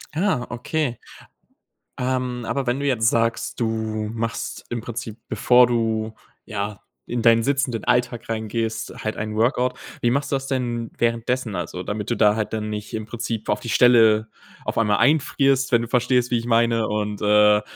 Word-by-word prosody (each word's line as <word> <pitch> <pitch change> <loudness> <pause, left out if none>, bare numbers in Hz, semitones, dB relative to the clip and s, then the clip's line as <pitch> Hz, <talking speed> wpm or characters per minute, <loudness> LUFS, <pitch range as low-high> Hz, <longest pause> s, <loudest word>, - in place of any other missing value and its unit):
Ah, 165 -9 +1
okay. 125 +1 -2 1.0
Ähm, 125 -2 -2
aber 140 -1 -1
wenn 125 +3 0
du 145 - -2
jetzt 115 -4 +3
sagst, 115 +2 -1
du 110 -2 -2
machst 115 0 -4
im 120 -2 -3
Prinzip, 115 -1 -6
bevor 125 0 +5
du, 110 -2 -1 0.3
ja, 105 -2 -4 0.3
in 120 -1 -2
deinen 115 -1 +5
sitzenden 135 -4 0
Alltag 120 -1 0
reingehst, 115 0 -3
halt 110 - -3
ein 105 0 -4
Workout, 125 +2 +1 0.2
wie 120 - +3
machst 140 +3 -1
du - - +2
das 135 - -7
denn 120 -3 -2
währenddessen, 115 0 0
also, 90 +1 -4
damit 105 +2 -4
du 120 - +1
da 105 -1 +4
halt 110 -1 -3
dann 105 -1 -2
nicht, 105 -1 -6
im 110 -1 -3
Prinzip, 115 -1 -4
auf 105 - +1
die 120 - -7
Stelle 110 -3 +5 0.4
auf - - -3
einmal 105 -2 +3
einfrierst, 135 -2 +2
wenn 120 -1 +4
du 115 - -5
verstehst, 125 0 +1
wie 120 - +3
ich 115 - -7
meine 115 -1 +2
und, 105 -1 -2
äh, 105 0 +5
115 Hz, 175 wpm, -23 LUFS, 110-125 Hz, 1.0 s, bevor